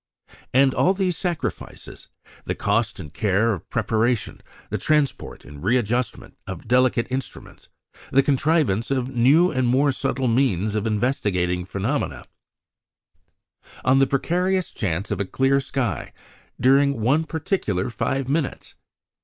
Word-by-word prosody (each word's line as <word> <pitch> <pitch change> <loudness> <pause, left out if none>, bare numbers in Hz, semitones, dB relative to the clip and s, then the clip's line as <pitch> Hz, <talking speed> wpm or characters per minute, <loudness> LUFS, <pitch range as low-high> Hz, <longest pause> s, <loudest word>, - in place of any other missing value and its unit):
And 135 +1 +4
all 190 +2 +2
these 185 -3 0
sacrifices 175 -4 -5 0.4
the - - -2
cost 105 +1 0
and 75 -4 -9
care 105 +4 +1
of 95 - -8
preparation, 110 0 0 0.3
the - - -1
transport 150 -3 -1
and 70 +1 -11
readjustment 120 +1 -1
of 95 +1 -7
delicate 125 -1 +3
instruments, 130 0 -6 0.4
the 135 +1 +4
contrivance 140 - +1
of 130 -2 -1
new 145 +10 +5
and 130 -3 0
more 135 +4 +3
subtle 130 0 -1
means 110 -5 +1
of 105 +1 -1
investigating 100 -6 0
phenomena 100 +10 -2 1.6
on 130 +1 +4
the 135 - +4
precarious 180 +7 0
chance 95 0 -3
of 100 -1 -1
a - - -1
clear 135 +7 +2
sky 135 -4 -3 0.5
during 140 0 +3
one 135 +8 +2
particular 155 - -2
five 135 +4 -2
minutes! 145 0 -2
125 Hz, 130 wpm, -23 LUFS, 105-140 Hz, 1.6 s, new